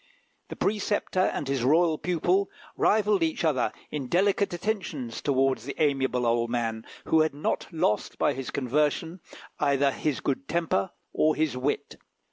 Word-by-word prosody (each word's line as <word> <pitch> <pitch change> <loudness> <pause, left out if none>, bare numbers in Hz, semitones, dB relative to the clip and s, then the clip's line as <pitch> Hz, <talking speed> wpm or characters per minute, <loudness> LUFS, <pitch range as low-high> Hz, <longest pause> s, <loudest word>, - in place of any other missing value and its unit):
The - - -6
preceptor 205 -2 -1
and 185 -6 0
his 135 -3 -1
royal 160 +4 +3
pupil 180 +3 +1 0.3
rivalled 210 -2 +3
each 160 0 0
other 130 -9 +1 0.2
in 140 -4 -3
delicate 195 +5 +2
attentions 175 - -3
towards 135 -4 +1
the 140 - -6
amiable 135 -4 +1
old 115 0 +1
man, 115 -2 -2 0.2
who 160 - +4
had 155 -2 0
not 145 - -2
lost 130 -10 0
by - - +2
his 135 0 -5
conversion 150 +6 0 0.4
either 140 -1 +3
his 150 0 -2
good 140 0 -2
temper 165 - 0 0.2
or 155 0 +3
his 155 -3 0
wit. 130 +3 -2
150 Hz, 150 wpm, -27 LUFS, 130-170 Hz, 0.4 s, who